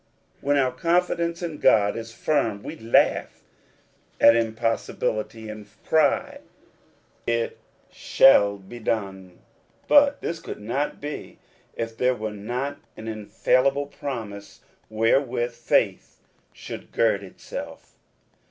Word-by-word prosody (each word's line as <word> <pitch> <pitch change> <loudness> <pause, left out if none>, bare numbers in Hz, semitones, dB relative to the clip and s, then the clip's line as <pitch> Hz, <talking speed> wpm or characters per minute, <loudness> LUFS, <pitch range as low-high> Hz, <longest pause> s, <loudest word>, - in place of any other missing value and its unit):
When 145 +1 +2
our 130 -2 +2
confidence 170 +3 0
in 160 -3 -4
God 100 -2 +4
is 115 0 -6
firm 115 -4 -1
we - - -6
laugh 115 +1 +1 0.8
at 115 - +7
impossibility, 115 -1 -2
and 105 -1 -8 0.2
cry, 160 -1 +2 0.5
" - - -37
It 115 - -4 0.3
shall 100 -6 +5
be 100 +5 -11
done; 95 -5 -3 0.5
but 285 -1 +5
this 165 - -3
could - - -8
not 120 +8 -2
be 145 +1 -7 0.4
if 115 -1 -4
there 125 +2 +2
were 110 -2 -4
not 125 +7 -4 0.2
an 110 - -8
infallible 130 +6 +1
promise 110 -8 -7 0.3
wherewith 120 +2 +1
faith 120 0 0 0.3
should - - -9
gird 110 -3 +2
itself. 95 -2 -9
115 Hz, 115 wpm, -24 LUFS, 110-140 Hz, 0.8 s, at